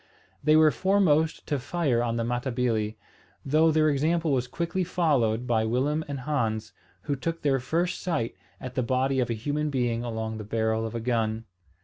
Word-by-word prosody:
They 155 +2 +5
were 155 -1 +6
foremost 180 -5 +2
to 145 - -1
fire 130 -2 0
on 115 -1 -1
the 115 - -1
Matabili; 120 -3 -1 0.5
though 155 +4 +4
their 155 0 +3
example 155 +3 +1
was 125 -2 +1
quickly 170 +7 -2
followed 135 -10 +1
by 115 -3 +1
Willem 135 +7 0
and 140 -2 -5
Hans, 115 -6 -2 0.3
who 145 - -1
took 165 +5 -4
their 135 -2 +2
first 165 +8 -1
sight 160 -11 -1 0.3
at 130 -1 -7
the 130 - 0
body 130 +2 +1
of 125 -2 0
a 115 - 0
human 145 +7 -2
being 120 -4 0
along 110 -2 -4
the - - -5
barrel 110 +1 0
of 110 - -8
a - - -1
gun. 115 -1 -1
130 Hz, 185 wpm, -27 LUFS, 115-155 Hz, 0.5 s, were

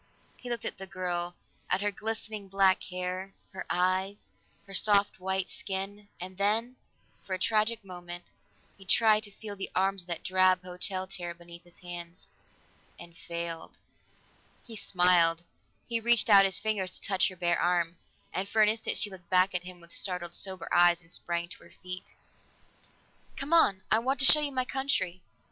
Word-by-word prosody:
He 250 - -9
looked 235 -3 -3
at - - -4
the 195 - -7
girl, 175 -2 -2 0.3
at 185 - +1
her 205 0 0
glistening 215 -1 -5
black 195 -1 +3
hair, 185 +1 -4 0.2
her 190 - -6
eyes, 185 +3 0 0.3
her 195 - -11
soft 200 0 +3
white 190 0 -1
skin, 200 +1 -5
and 185 +1 -8
then, 225 +5 +1 0.5
for 190 - -3
a - - -4
tragic 215 +2 +1
moment, 175 -1 -7 0.6
he - - -12
tried 215 +2 +4
to 210 -1 -6
feel 205 0 -8
the 195 - -5
arms 195 +1 +1
of 175 - -9
that 170 -2 -4
drab 185 0 +3
hotel 185 +1 -3
chair 180 -3 -6
beneath 170 0 -11
his 175 -1 -19
hands 175 0 -8 0.7
and 170 -1 -12
failed. 170 -1 -6 0.9
He 230 - -9
smiled; 175 -4 +4 0.4
he 235 -1 0
reached 235 -1 +4
out 195 -1 +9
his 190 - +1
fingers 205 -4 -2
to - - -12
touch 190 -1 +2
her 185 - -6
bare 175 -1 +1
arm, 175 -1 +1 0.4
and 195 +2 -2
for 220 - +4
an 210 - +5
instant 220 +1 -1
she 205 - +2
looked 180 -2 -13
back 185 +1 +4
at 175 0 -2
him 180 -1 -10
with 170 0 -16
startled, 180 -3 -3
sober 190 -3 -3
eyes, 175 0 +5
and 165 0 -18
sprang 170 -1 -2
to - - -11
her - - -18
feet. 180 0 -6 1.3
"Come 280 +4 -2
on! 195 - +5
I 220 - +5
want 265 +4 0
to - - +5
show 305 - +8
you 295 -1 -1
my 255 -1 0
country." 220 -10 -1
190 Hz, 180 wpm, -29 LUFS, 175-205 Hz, 1.3 s, out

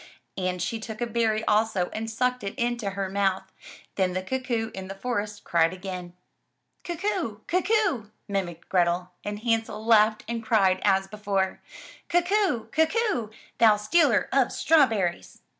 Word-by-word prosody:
And 185 -1 -2
she 225 +5 -2
took 220 -1 -7
a 240 - 0
berry 225 -1 0
also 210 -4 +1
and 225 +1 -4
sucked 250 +2 -1
it 195 - -4
into 240 -4 -1
her 195 0 -3
mouth. 190 -1 -1 0.4
Then 185 -2 +1
the 185 0 -2
cuckoo 235 -1 -2
in 190 0 -7
the 195 - -7
forest 210 -1 -3
cried 165 -1 +2
again. 180 -2 -7 0.7
"Cuck 345 +1 -6
oo! 340 - -1
Cuck 365 +3 0
oo! 375 - +1 0.2
mimicked 185 -5 -3
Grethel, 180 0 +1
and 205 0 -4
Hansel 225 -2 -1
laughed 215 -1 +4
and 230 0 -3
cried 195 -4 +3
as 195 -1 +3
before, 195 -1 -2 0.5
"Cuck 350 +1 +1
oo! 390 - +1
Cuck 320 +5 +2
oo! 415 - 0 0.3
thou 220 -2 +6
stealer 245 +3 +3
of 270 -3 +3
straw 315 -4 +4
berries!' 190 -7 -3
215 Hz, 160 wpm, -26 LUFS, 195-245 Hz, 0.7 s, thou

